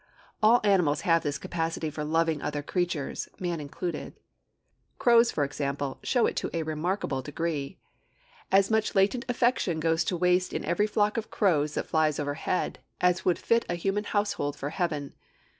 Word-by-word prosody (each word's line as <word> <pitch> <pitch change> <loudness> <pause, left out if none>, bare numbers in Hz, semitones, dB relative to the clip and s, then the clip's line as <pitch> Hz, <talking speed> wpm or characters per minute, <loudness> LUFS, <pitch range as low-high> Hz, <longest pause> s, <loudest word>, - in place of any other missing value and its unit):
All 225 +3 +6
animals 180 -8 +3
have 165 -1 +3
this 145 -1 -2
capacity 165 0 -3
for 150 0 -4
loving 160 0 +1
other 145 -1 -3
creatures, 175 -4 -2
man 175 -3 -2
included. 165 +4 -5 0.8
Crows, 235 -1 +5
for 145 - 0
example, 140 -1 -3
show 245 -3 +2
it - - -1
to - - -1
a 165 - -1
remarkable 155 -2 -2
degree. 150 +2 -3 0.7
'As 195 +2 +4
much 220 -1 +1
latent 205 +6 +2
affection 240 -9 +1
goes 165 +1 +2
to 180 - -1
waste 180 +1 +2
in - - -3
every 205 +5 +1
flock 210 +1 +1
of 225 - -3
crows 155 -7 +1
that - - -1
flies 155 -2 +1
overhead 145 +5 -2 0.2
as 180 0 +2
would 180 - +3
fit 230 0 +2
a 175 - 0
human 195 +4 -1
household 205 -10 -1
for 145 0 -5
heaven.' 155 -6 -2
170 Hz, 165 wpm, -28 LUFS, 150-200 Hz, 0.8 s, All